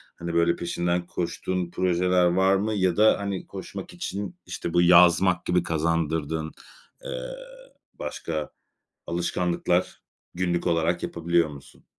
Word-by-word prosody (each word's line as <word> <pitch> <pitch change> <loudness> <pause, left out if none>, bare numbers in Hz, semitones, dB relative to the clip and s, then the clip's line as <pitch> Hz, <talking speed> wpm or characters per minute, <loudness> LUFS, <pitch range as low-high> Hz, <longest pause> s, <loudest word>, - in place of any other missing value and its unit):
Hani, 85 0 -5
böyle 85 0 +3
peşinden 85 0 -1
koştuğun 90 0 -3
projeler 90 0 +2
var 95 +2 +3
mı, 105 +3 0
ya 95 -4 +1
da 110 +1 +5
hani 100 -2 -4
koşmak 100 - -8
için, 100 - -5
işte, 85 - -5
bu 85 - +4
yazmak 90 0 +5
gibi 90 0 +2
kazandırdığın, 80 -1 -1 0.5
eee, - - -5 0.6
başka 80 -3 -4 0.6
alışkanlıklar, 85 +1 -1 0.3
günlük 90 -1 0
olarak 85 0 +1
yapabiliyor 85 -1 +1
musun? 70 -2 -13
85 Hz, 120 wpm, -25 LUFS, 85-95 Hz, 0.6 s, da